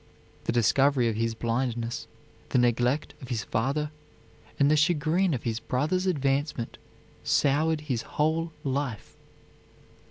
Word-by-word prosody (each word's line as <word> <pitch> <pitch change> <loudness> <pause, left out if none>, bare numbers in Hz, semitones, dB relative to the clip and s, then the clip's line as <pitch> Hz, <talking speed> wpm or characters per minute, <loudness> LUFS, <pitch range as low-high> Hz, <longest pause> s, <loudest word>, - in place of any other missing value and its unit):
The - - +1
discovery 125 +2 +3
of 110 - -2
his 115 +1 -1
blindness, 115 0 -2 0.4
the - - +1
neglect 125 +3 +2
of 130 - -8
his 115 -4 -2
father, 140 +6 -1 0.7
and 140 +1 +4
the - - +5
chagrin 165 +3 +2
of 120 - -5
his 115 -1 -1
brothers' 155 +11 0
advancement 140 -5 -1 0.4
soured 150 +3 +2
his 130 -6 -2
whole 160 +5 0
life. 135 -5 -3
135 Hz, 125 wpm, -27 LUFS, 120-150 Hz, 0.7 s, the